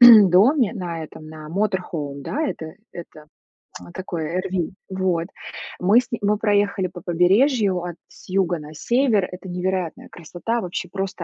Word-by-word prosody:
доме, 225 Hz, -, +8 dB
на 170 Hz, -5 st, -4 dB
этом, 155 Hz, 0 st, -12 dB
на 155 Hz, -1 st, -9 dB
motorhome, 170 Hz, -7 st, -2 dB
да, 305 Hz, -, -2 dB
это 160 Hz, -, -5 dB, 0.2 s
это 155 Hz, -3 st, -10 dB, 0.7 s
такое 175 Hz, -1 st, -3 dB
RV. 185 Hz, -3 st, -2 dB, 0.2 s
Вот. 185 Hz, -3 st, 0 dB, 0.5 s
Мы 205 Hz, +7 st, +5 dB
с 250 Hz, 0 st, -17 dB
ним 235 Hz, -, -2 dB
мы 210 Hz, +1 st, +3 dB
проехали 205 Hz, -3 st, +2 dB
по 175 Hz, -1 st, -10 dB
побережью, 190 Hz, -, +3 dB
от 175 Hz, -1 st, -5 dB
с -, -, -17 dB
юга 185 Hz, -3 st, +1 dB
на 150 Hz, +1 st, -10 dB
север. 235 Hz, -, +2 dB
Это 180 Hz, +1 st, -9 dB
невероятная 180 Hz, -1 st, -2 dB
красота. 175 Hz, +8 st, -3 dB
Вообще, 180 Hz, 0 st, -4 dB
просто 190 Hz, -2 st, -4 dB
185 Hz, 150 wpm, -23 LUFS, 170-205 Hz, 0.7 s, доме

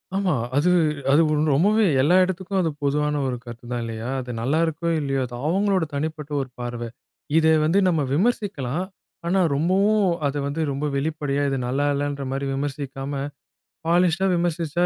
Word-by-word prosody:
ஆமா. 195 Hz, -3 st, +1 dB, 0.2 s
அது 155 Hz, +5 st, +3 dB, 0.4 s
அது 145 Hz, +4 st, +6 dB, 0.3 s
ரொம்பவே 210 Hz, +8 st, +4 dB, 0.2 s
எல்லா 165 Hz, +7 st, +4 dB
இடத்துக்கும் 190 Hz, +1 st, -2 dB
அது 165 Hz, -, +1 dB
பொதுவான 150 Hz, +1 st, +1 dB
ஒரு 125 Hz, -1 st, -2 dB
கருத்துதான் 120 Hz, 0 st, -6 dB
இல்லையா? 115 Hz, +1 st, -5 dB
அது 125 Hz, -1 st, -5 dB
நல்லா 140 Hz, +7 st, +1 dB
இருக்கோ, 165 Hz, +1 st, -2 dB
இல்லையோ 135 Hz, -2 st, -1 dB
அது 120 Hz, -1 st, -8 dB
அவங்களோட 195 Hz, +1 st, +2 dB
தனிப்பட்ட 155 Hz, 0 st, -4 dB
ஒரு 130 Hz, -, -6 dB
பார்வை. 120 Hz, -1 st, -4 dB, 0.5 s
இதை 160 Hz, 0 st, +5 dB
வந்து 170 Hz, +6 st, +3 dB
நம்ம 165 Hz, -4 st, +2 dB
விமர்சிக்கலாம். 185 Hz, -, 0 dB, 0.4 s
ஆனா 190 Hz, +3 st, +2 dB, 0.2 s
ரொம்பவும் 195 Hz, +7 st, +2 dB, 0.2 s
அத 140 Hz, -, -3 dB
வந்து 145 Hz, +3 st, -2 dB
ரொம்ப 140 Hz, +2 st, -2 dB
வெளிப்படையா, 145 Hz, -1 st, -1 dB
இது 135 Hz, -, -1 dB
நல்லா 140 Hz, +3 st, 0 dB
இல்லன்ற 145 Hz, -1 st, -2 dB
மாரி 140 Hz, +1 st, -2 dB
விமர்சிக்காம, 140 Hz, 0 st, -4 dB, 0.7 s
பாலிஷ்டா 175 Hz, +2 st, +3 dB
விமர்சிச்சா, 170 Hz, 0 st, 0 dB
150 Hz, 150 wpm, -23 LUFS, 135-175 Hz, 0.7 s, அது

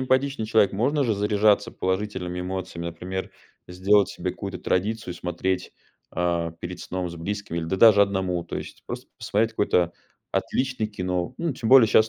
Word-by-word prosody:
эмпатичный 130 Hz, -2 st, +1 dB
человек, 110 Hz, -2 st, +4 dB
можно 135 Hz, +8 st, +1 dB
же 115 Hz, -, +1 dB
заряжаться 105 Hz, 0 st, +3 dB
положительными 95 Hz, -2 st, -2 dB
эмоциями. 90 Hz, -2 st, -4 dB
Например, 90 Hz, +3 st, -5 dB, 0.4 s
сделать 100 Hz, +3 st, +3 dB
себе -, -, -3 dB
какую-то -, -, -6 dB
традицию 105 Hz, 0 st, -1 dB
и -, -, -10 dB
смотреть, 90 Hz, +1 st, -2 dB, 0.4 s
э, 85 Hz, -1 st, 0 dB
перед 90 Hz, 0 st, -6 dB
сном 90 Hz, -1 st, -3 dB
с 85 Hz, -, -8 dB
близкими 100 Hz, 0 st, -4 dB
или, 80 Hz, -, -2 dB
да 95 Hz, -, -1 dB
даже 105 Hz, 0 st, +7 dB
одному. 95 Hz, -3 st, +1 dB
То -, -, -5 dB
есть -, -, -8 dB
просто -, -, -6 dB
посмотреть 110 Hz, +2 st, +1 dB
какое-то 90 Hz, -5 st, +2 dB, 0.4 s
отличное 130 Hz, -4 st, 0 dB
кино. 90 Hz, +1 st, -2 dB
Ну, 170 Hz, -3 st, -1 dB
тем 115 Hz, -3 st, -3 dB
более 130 Hz, -4 st, +9 dB
щас 110 Hz, +1 st, +5 dB
95 Hz, 170 wpm, -25 LUFS, 90-110 Hz, 0.4 s, более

